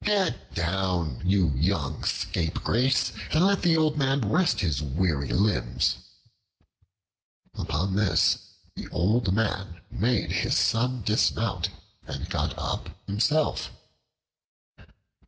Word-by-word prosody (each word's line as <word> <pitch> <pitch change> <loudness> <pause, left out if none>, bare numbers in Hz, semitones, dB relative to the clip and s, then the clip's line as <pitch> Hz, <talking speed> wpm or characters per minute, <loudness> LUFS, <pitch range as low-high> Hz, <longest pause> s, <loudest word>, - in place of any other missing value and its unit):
Get 195 -10 0
down, 85 -5 -1
you 95 -2 +3
young 80 -1 -1
scapegrace, 120 +10 0 0.2
and 160 +4 +4
let 200 0 +2
the 170 -3 +3
old 155 -1 +2
man 135 0 +2
rest 175 - +2
his 80 -7 0
weary 75 0 0
limbs." 100 -1 +1 1.6
Upon 95 +6 -2
this 95 -6 +3 0.4
the - - -7
old 100 +4 +1
man 95 -5 -1
made 115 0 0
his - - +1
son 125 0 +1
dismount, 105 +2 +1 0.4
and - - -5
got - - -1
up - - -3 0.2
himself. 135 +10 +1
100 Hz, 105 wpm, -26 LUFS, 85-130 Hz, 1.6 s, and